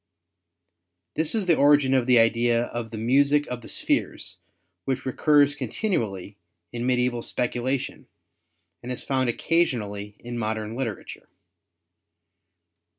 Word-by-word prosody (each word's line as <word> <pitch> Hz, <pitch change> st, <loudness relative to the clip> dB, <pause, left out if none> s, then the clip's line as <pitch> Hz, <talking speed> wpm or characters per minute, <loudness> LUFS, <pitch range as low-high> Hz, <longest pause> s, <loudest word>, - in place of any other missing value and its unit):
This 160 Hz, +6 st, 0 dB
is 215 Hz, -3 st, 0 dB
the 170 Hz, -2 st, +4 dB
origin 145 Hz, -2 st, +4 dB
of 130 Hz, -2 st, +2 dB
the 125 Hz, -1 st, +5 dB
idea 115 Hz, +1 st, +3 dB
of 120 Hz, -1 st, -5 dB
the 115 Hz, -, -7 dB
music 140 Hz, +6 st, +3 dB
of 125 Hz, -3 st, -6 dB
the -, -, -12 dB
spheres -, -, -2 dB, 0.5 s
which 130 Hz, -1 st, -2 dB
recurs 145 Hz, +2 st, +3 dB
continually 105 Hz, -, -3 dB, 0.3 s
in 120 Hz, +1 st, -3 dB
medieval 125 Hz, -1 st, +1 dB
speculation 125 Hz, +2 st, -3 dB, 0.7 s
and 125 Hz, -, -6 dB
is 125 Hz, -, -4 dB
found 130 Hz, -2 st, 0 dB
occasionally 105 Hz, -9 st, -1 dB
in 120 Hz, 0 st, -6 dB
modern 110 Hz, 0 st, -3 dB
literature. 120 Hz, -5 st, -6 dB
125 Hz, 120 wpm, -25 LUFS, 115-140 Hz, 0.7 s, the